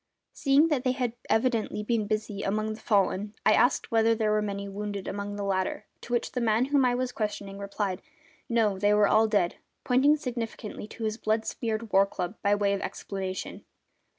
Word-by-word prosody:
Seeing 280 Hz, +3 st, +4 dB
that 280 Hz, -5 st, 0 dB
they 255 Hz, -, +2 dB
had 250 Hz, -3 st, -2 dB, 0.2 s
evidently 225 Hz, -2 st, +1 dB
been 215 Hz, -1 st, 0 dB
busy 215 Hz, -1 st, -2 dB
among 215 Hz, +2 st, -1 dB
the 215 Hz, -, -10 dB
fallen 205 Hz, -1 st, +1 dB
I -, -, +6 dB
asked 245 Hz, +2 st, +2 dB
whether 225 Hz, 0 st, +4 dB
there 215 Hz, -1 st, +1 dB
were 215 Hz, 0 st, +2 dB
many 200 Hz, -1 st, -3 dB
wounded 200 Hz, 0 st, -5 dB
among 205 Hz, +1 st, -4 dB
the 205 Hz, -, -4 dB
latter, 190 Hz, -1 st, -1 dB, 0.2 s
to -, -, -10 dB
which 240 Hz, -, 0 dB
the 250 Hz, -, -2 dB
man 225 Hz, +1 st, +3 dB
whom 280 Hz, -2 st, +5 dB
I 245 Hz, -1 st, +2 dB
was 255 Hz, 0 st, -1 dB
questioning 205 Hz, -3 st, -4 dB
replied: 200 Hz, -1 st, -3 dB, 0.5 s
No, 220 Hz, -5 st, +2 dB
they 205 Hz, +1 st, +4 dB
were 210 Hz, -1 st, +5 dB
all 220 Hz, +2 st, +4 dB
dead! 200 Hz, -5 st, +1 dB, 0.3 s
pointing 265 Hz, +4 st, +4 dB
significantly 235 Hz, -6 st, -5 dB
to 225 Hz, -, -8 dB
his 215 Hz, 0 st, -1 dB
blood 220 Hz, 0 st, 0 dB
smeared 225 Hz, -2 st, -3 dB
war 195 Hz, +1 st, +6 dB
club 180 Hz, -1 st, -4 dB
by 205 Hz, 0 st, +3 dB
way 200 Hz, -1 st, +1 dB
of 200 Hz, -, -2 dB
explanation. 190 Hz, -1 st, -5 dB
215 Hz, 195 wpm, -28 LUFS, 200-235 Hz, 0.5 s, I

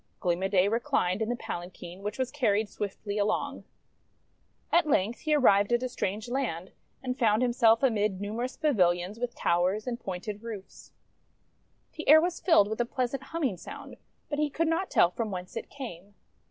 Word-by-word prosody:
Gleam 175 Hz, 0 st, 0 dB
o' 190 Hz, -, +1 dB
Day 190 Hz, -1 st, +3 dB
reclined 225 Hz, -4 st, 0 dB
in 220 Hz, -, 0 dB
the 245 Hz, -, 0 dB
palanquin, 175 Hz, -2 st, -7 dB
which 210 Hz, +1 st, -4 dB
was 260 Hz, -1 st, -1 dB
carried 220 Hz, -7 st, +1 dB
swiftly 205 Hz, +1 st, -4 dB
along. 205 Hz, +1 st, -1 dB, 1.1 s
At 340 Hz, -2 st, +4 dB
length 230 Hz, -4 st, +1 dB
he 310 Hz, -1 st, +1 dB
arrived 205 Hz, -7 st, +4 dB
at 240 Hz, +1 st, +2 dB
a 255 Hz, -, -1 dB
strange 210 Hz, -1 st, -3 dB
land, 240 Hz, -9 st, -3 dB, 0.3 s
and 255 Hz, 0 st, -3 dB
found 220 Hz, -1 st, +3 dB
himself 235 Hz, -1 st, +4 dB
amid 210 Hz, -6 st, +1 dB
numerous 225 Hz, +6 st, -4 dB
pavilions 185 Hz, -, +1 dB
with 245 Hz, -1 st, -3 dB
towers 185 Hz, +5 st, +1 dB
and 245 Hz, -2 st, -3 dB
pointed 200 Hz, +1 st, -5 dB
roofs. 220 Hz, -4 st, -9 dB, 1.0 s
The 310 Hz, -, -5 dB
air 310 Hz, +1 st, +10 dB
was 345 Hz, +1 st, -1 dB
filled 325 Hz, -, +5 dB
with 220 Hz, +3 st, -2 dB
a -, -, +1 dB
pleasant 255 Hz, +2 st, -2 dB
humming 275 Hz, -, -2 dB
sound, -, -, -10 dB, 0.3 s
but 290 Hz, -, -3 dB
he 300 Hz, -1 st, +1 dB
could 330 Hz, +3 st, 0 dB
not 335 Hz, +4 st, 0 dB
tell 175 Hz, -, +4 dB
from 225 Hz, +3 st, -3 dB
whence 180 Hz, -2 st, -6 dB
it -, -, -5 dB
came. 205 Hz, -8 st, -9 dB
220 Hz, 180 wpm, -28 LUFS, 195-255 Hz, 1.1 s, air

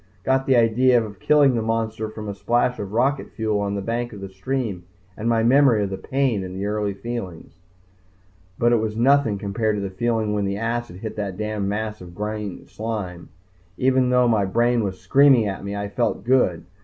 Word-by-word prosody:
Got 130 Hz, 0 st, +1 dB
the 135 Hz, -, +4 dB
idea 120 Hz, +2 st, +4 dB
of 105 Hz, -3 st, -10 dB
killing 145 Hz, -3 st, +4 dB
the 115 Hz, -, 0 dB
monster 110 Hz, -1 st, -2 dB
from 110 Hz, -1 st, -8 dB
a 100 Hz, -, -3 dB
splash 120 Hz, +5 st, 0 dB
of 100 Hz, -1 st, -5 dB
rocket 130 Hz, +5 st, 0 dB
fuel 110 Hz, -2 st, 0 dB
on 100 Hz, 0 st, -2 dB
the 100 Hz, -, -3 dB
bank 120 Hz, +2 st, -3 dB
of 100 Hz, -, -9 dB
the 95 Hz, 0 st, -7 dB
stream 100 Hz, 0 st, -3 dB, 0.3 s
and 110 Hz, +2 st, -2 dB
my 115 Hz, -1 st, +2 dB
memory 125 Hz, -3 st, +4 dB
of 100 Hz, -, -3 dB
the 95 Hz, -, -3 dB
pain 130 Hz, -7 st, 0 dB
in 90 Hz, 0 st, -7 dB
the 95 Hz, +1 st, -3 dB
early 105 Hz, -1 st, -1 dB
feelings. 100 Hz, -7 st, -6 dB, 1.1 s
But 120 Hz, 0 st, +3 dB
it 120 Hz, -, +4 dB
was 110 Hz, -1 st, -2 dB
nothing 130 Hz, -3 st, +3 dB
compared 105 Hz, +2 st, -1 dB
to -, -, -2 dB
the 95 Hz, -, -4 dB
feeling 110 Hz, +1 st, -1 dB
when 105 Hz, -1 st, 0 dB
the 100 Hz, 0 st, -2 dB
acid 115 Hz, -3 st, -3 dB
hit 110 Hz, -, -5 dB
that 100 Hz, -3 st, -3 dB
damned 105 Hz, -2 st, -2 dB
mass 105 Hz, 0 st, -3 dB
of 85 Hz, -1 st, -11 dB
green 105 Hz, -1 st, -5 dB
slime! 105 Hz, -6 st, -5 dB, 0.5 s
Even 130 Hz, 0 st, +2 dB
though 125 Hz, -1 st, +4 dB
my 110 Hz, -4 st, +2 dB
brain 120 Hz, +4 st, +1 dB
was 95 Hz, -2 st, -4 dB
screaming 130 Hz, +2 st, +5 dB
at 95 Hz, -1 st, -5 dB
me, 100 Hz, +1 st, -4 dB
I 100 Hz, 0 st, -3 dB
felt 105 Hz, -1 st, -1 dB
good. 115 Hz, -9 st, +2 dB
110 Hz, 205 wpm, -23 LUFS, 100-120 Hz, 1.1 s, screaming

